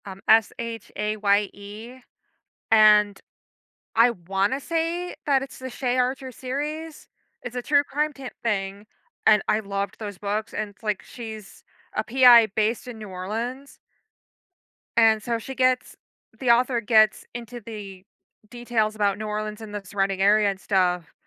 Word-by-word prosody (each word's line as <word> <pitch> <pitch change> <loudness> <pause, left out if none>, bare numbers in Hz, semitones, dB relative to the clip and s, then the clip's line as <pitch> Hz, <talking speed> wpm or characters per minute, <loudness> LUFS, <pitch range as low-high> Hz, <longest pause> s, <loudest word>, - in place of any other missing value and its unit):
Um, 195 -1 -9
S-H-A-Y-E, 215 0 0 0.7
and 210 -2 +5 0.8
I 230 +2 +6
wanna 195 +5 -1
say 335 +3 -2
that 275 -3 +3
it's 270 - -8
the 260 - -6
Shaye 250 0 -2
Archer 260 +1 -1
series. 295 +6 -5 0.3
It's 245 0 -8
a 250 - -2
true 285 +1 +3
crime 300 +2 -1
tam 270 -2 -8
thing, 200 -2 -2 0.4
and 210 -2 +6
I 210 - +2
loved 200 -1 -4
those 205 -3 -6
books, 210 +1 -3
and 215 - -3
it's, 210 +3 -23
like, 210 -3 -1
she's 220 -4 -10 0.3
a - - 0
PI 245 -2 +7
based 215 +4 -1
in 235 -3 -8
New 210 -2 -8
Orleans 230 +9 -5 1.2
and 220 -2 +5
so 235 -1 -1
she 265 +4 -8
gets 255 0 +1 0.4
the 255 - -1
author 240 +1 +4
gets 215 -1 +4
into 240 0 -7
the 200 -4 -9 0.5
details 235 -3 -1
about 205 -2 +1
New 215 - -5
Orleans 215 0 -4
and 215 -2 -9
the 205 - -4
surrounding 195 0 -1
area 205 +1 +4
and 195 -1 -4
stuff, 180 -3 0
220 Hz, 145 wpm, -24 LUFS, 205-250 Hz, 1.2 s, PI